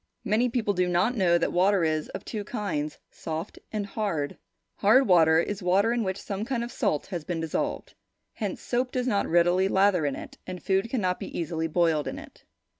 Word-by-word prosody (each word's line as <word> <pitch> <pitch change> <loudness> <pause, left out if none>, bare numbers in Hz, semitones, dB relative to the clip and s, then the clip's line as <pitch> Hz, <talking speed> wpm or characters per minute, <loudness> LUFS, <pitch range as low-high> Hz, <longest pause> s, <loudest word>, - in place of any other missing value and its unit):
Many 225 +5 +2
people 225 -4 0
do 180 -1 +1
not 180 +8 +2
know 180 -5 +3
that 170 - 0
water 185 +1 +3
is 155 -1 0
of - - -7
two 215 -3 -4
kinds, 190 -9 -3
soft 160 +4 -6
and 210 -2 -2
hard. 195 -9 -2 0.4
Hard 240 +7 +5
water 160 -4 +5
is 200 +4 -2
water 195 +6 +3
in 240 -1 0
which 190 -1 -2
some 200 +1 -4
kind 235 0 -2
of 240 - -6
salt 150 - 0
has 175 -5 -5
been 170 +1 -3
dissolved. 160 -1 -3 0.4
Hence, - - -4
soap 250 +1 -1
does 250 -1 -1
not 205 -6 +1
readily 175 +3 +3
lather 190 -5 +3
in 140 - -2
it, - - -10
and 180 -3 -6
food 195 +3 +1
cannot 185 -8 0
be - - -6
easily 165 -1 -2
boiled 160 -2 +1
in 275 - -4
it. 305 -1 -13
190 Hz, 200 wpm, -27 LUFS, 170-215 Hz, 0.4 s, Hard